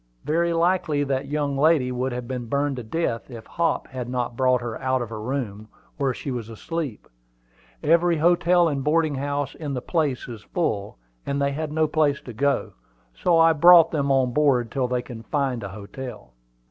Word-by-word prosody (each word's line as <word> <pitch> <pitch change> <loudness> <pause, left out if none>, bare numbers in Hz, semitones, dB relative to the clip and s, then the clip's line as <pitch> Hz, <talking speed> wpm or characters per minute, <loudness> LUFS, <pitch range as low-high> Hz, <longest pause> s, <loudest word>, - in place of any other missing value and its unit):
Very 170 +2 +1
likely 170 -3 +1
that 135 0 -2
young 145 -1 -1
lady 140 -3 +3
would 125 +1 -2
have 120 -1 -5
been 125 -2 -4
burned 140 +2 0
to 125 - -5
death 115 -1 -2
if 115 -3 -9
Hop 170 -1 -1
had 125 -2 -5
not 125 -1 -2
brought 130 0 +3
her 120 -2 -5
out 130 0 +1
of 120 -3 -4
her 110 -1 -5
room, 110 -4 -4 0.3
where 135 -2 +1
she 135 +2 -5
was 120 -3 -5
asleep. 145 +1 -5 0.8
Every 170 +2 +3
hotel 175 +2 +4
and 140 -4 -2
boarding 155 +1 +2
house 140 +1 -2
in 145 -4 -5
the - - -1
place 150 -7 -1
is 115 -4 -8
full, 105 - -2 0.3
and 140 0 -2
they 140 0 +1
had 155 +1 -4
no 155 +1 +2
place 150 -2 +1
to 120 - -9
go: 140 +4 0 0.4
so 170 - +2
I 165 0 +6
brought 170 +1 +7
them 140 -3 0
on 130 -2 +2
board 130 -6 +2
till 130 -3 0
they 125 0 -1
can 120 -3 -9
find 130 -1 -1
a 100 - -5
hotel." 105 - -9
140 Hz, 195 wpm, -24 LUFS, 125-155 Hz, 0.8 s, brought